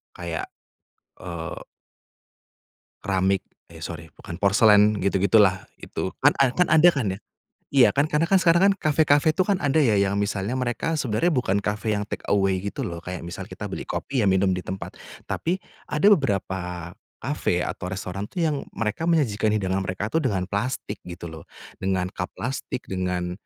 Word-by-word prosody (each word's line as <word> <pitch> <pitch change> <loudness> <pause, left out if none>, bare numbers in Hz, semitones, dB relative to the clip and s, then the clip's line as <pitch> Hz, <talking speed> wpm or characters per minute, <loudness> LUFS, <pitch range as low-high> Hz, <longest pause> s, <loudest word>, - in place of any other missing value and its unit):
kayak, 85 -2 -4 0.7
eee 85 -1 -6 1.4
keramik 95 -1 +1 0.2
eh 80 -1 -11
sorry 80 -1 -6
bukan, 85 - -9
porselen 105 +1 +5
gitu-gitu 100 +2 +2
lah 95 -2 0
itu 95 - -4
kan 145 - +7
a 135 -2 +4
kan 180 - +3
ada 155 +2 +7
kan 140 -9 -1
ya. 95 - -6 0.5
Iya 135 -3 +6
kan 140 - +4
karena 155 +2 +1
kan 195 - +5
sekarang 170 -1 +4
kan - - +2
kafe-kafe 155 -1 +3
itu 185 - -2
kan 195 +1 +1
ada 150 -2 +2
ya 115 -8 +3
yang 100 0 +1
misalnya 100 +1 -2
mereka 130 +5 -1
sebenarnya 135 +8 +1
bukan 110 -7 +1
kafe 105 +1 -1
yang 105 - -2
take - - -5
away 95 -2 +2
gitu 100 - -4
loh, 85 -1 -5
kayak 90 -1 -6
misal 85 - -6
kita - - -8
beli - - -4
kopi 135 -2 -2
ya - - +2
minum 95 0 +3
di 90 - -3
tempat. 95 +2 -6 0.3
Tapi 175 +3 -1 0.3
ada 150 +6 +2
beberapa 95 - -3 0.3
kafe 115 -9 -1
atau 90 - -5
restoran 100 +1 -5
tuh 175 - -1
yang 150 -2 0 0.2
mereka 110 +6 -2
menyajikan 120 -11 +2
hidangan 95 -3 0
mereka 95 +2 -3
tuh 165 - +2
dengan 100 -9 0
plastik 105 +1 -3
gitu 85 -1 -8
loh, 80 - -9 0.4
dengan 95 -1 0
cup 90 - -3
plastik, 125 0 -4
dengan 90 -1 -2
100 Hz, 175 wpm, -24 LUFS, 95-135 Hz, 1.4 s, kan